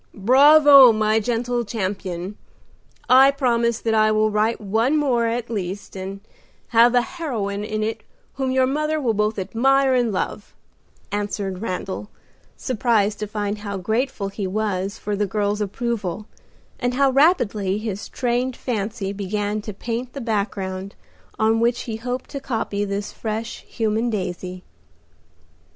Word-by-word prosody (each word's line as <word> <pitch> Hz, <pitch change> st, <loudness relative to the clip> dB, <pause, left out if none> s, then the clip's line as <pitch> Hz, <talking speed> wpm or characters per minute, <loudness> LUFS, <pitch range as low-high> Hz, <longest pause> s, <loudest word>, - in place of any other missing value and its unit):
"Bravo, 275 Hz, +4 st, +8 dB
my 215 Hz, 0 st, +2 dB
gentle 240 Hz, +2 st, -1 dB
champion! 190 Hz, -3 st, -4 dB, 0.7 s
I 265 Hz, +2 st, +7 dB
promise 235 Hz, -4 st, +1 dB
that 225 Hz, -, 0 dB
I 215 Hz, 0 st, +4 dB
will 215 Hz, 0 st, +2 dB
write 215 Hz, +2 st, +1 dB
one 225 Hz, +8 st, +1 dB
more 250 Hz, -6 st, +2 dB
at 235 Hz, 0 st, -3 dB
least, 195 Hz, -2 st, -5 dB
and 195 Hz, +1 st, -6 dB, 0.5 s
have 235 Hz, +1 st, +5 dB
a 245 Hz, -, +4 dB
heroine 235 Hz, -, -4 dB
in 215 Hz, 0 st, -2 dB
it 220 Hz, +1 st, -3 dB, 0.3 s
whom 265 Hz, -1 st, -2 dB
your 260 Hz, 0 st, +3 dB
mother 305 Hz, +3 st, 0 dB
will 245 Hz, -6 st, +1 dB
both 210 Hz, +1 st, 0 dB
admire 265 Hz, +7 st, +2 dB
and 245 Hz, -3 st, +2 dB
love," 200 Hz, +2 st, -4 dB, 0.6 s
answered 205 Hz, -2 st, -3 dB
Randal, 195 Hz, 0 st, -4 dB, 0.5 s
surprised 220 Hz, -5 st, +1 dB
to 210 Hz, -, -3 dB
find 205 Hz, 0 st, -3 dB
how 200 Hz, -1 st, -5 dB
grateful 220 Hz, +2 st, -1 dB
he 200 Hz, -1 st, -4 dB
was 200 Hz, 0 st, -2 dB
for 210 Hz, 0 st, -3 dB
the 205 Hz, 0 st, 0 dB
girl's 205 Hz, +1 st, -1 dB
approval, 210 Hz, -2 st, -3 dB, 0.5 s
and 245 Hz, -1 st, -1 dB
how 275 Hz, 0 st, +3 dB
rapidly 235 Hz, -, +2 dB
his 210 Hz, -2 st, -5 dB
trained 250 Hz, 0 st, -1 dB
fancy 210 Hz, -3 st, -3 dB
began 205 Hz, +1 st, -2 dB
to 210 Hz, -, -6 dB
paint 235 Hz, +4 st, -5 dB
the -, -, -6 dB
background 200 Hz, -3 st, -3 dB, 0.4 s
on 220 Hz, +1 st, +2 dB
which 235 Hz, +1 st, +1 dB
he 220 Hz, -2 st, -5 dB
hoped 245 Hz, +2 st, -5 dB
to 280 Hz, -, -4 dB
copy 220 Hz, -6 st, -2 dB
this 200 Hz, 0 st, -3 dB
fresh, 220 Hz, +1 st, -5 dB
human 225 Hz, +1 st, -1 dB
daisy. 185 Hz, -3 st, -4 dB
220 Hz, 145 wpm, -22 LUFS, 200-245 Hz, 0.7 s, Bravo